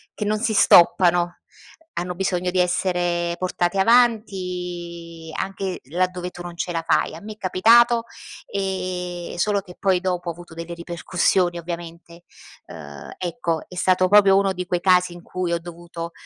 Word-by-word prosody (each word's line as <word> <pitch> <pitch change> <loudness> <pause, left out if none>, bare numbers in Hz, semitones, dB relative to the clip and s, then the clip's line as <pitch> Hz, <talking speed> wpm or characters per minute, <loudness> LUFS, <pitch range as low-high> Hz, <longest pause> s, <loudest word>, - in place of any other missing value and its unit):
che 210 - -3
non 215 +1 +1
si 225 0 0
stoppano, 175 -2 +5 0.6
hanno 180 +1 -3
bisogno 180 -1 -1
di 185 - 0
essere 175 -1 0
portate 180 0 -1
avanti 180 -7 0
anche 195 -1 -3
laddove 180 +3 -2
tu 175 - -11
non 175 -1 -8
ce 175 - -3
la 165 -1 -2
fai. - - +1
A 165 - -10
me 215 +1 -8
è 210 - -23
capitato, 230 +5 +4 0.4
ehm, 180 -3 -4
solo 200 +3 +1
che 180 -2 -14
poi 190 -2 +2
dopo 180 -2 -2
ho - - -1
avuto 175 0 -13
delle 170 +1 -7
ripercussioni 175 +1 0
ovviamente. 170 0 -8 0.4
Uhm, 70 -1 -10
ecco 170 -3 -2
è 180 - -12
stato 185 0 +3
proprio 195 0 +6
uno 195 -1 +2
di 180 0 -5
quei 180 0 -1
casi 180 -1 +3
in 175 0 -12
cui 180 -1 -3
ho 170 - 0
dovuto, 170 0 -8
180 Hz, 160 wpm, -22 LUFS, 175-190 Hz, 0.6 s, proprio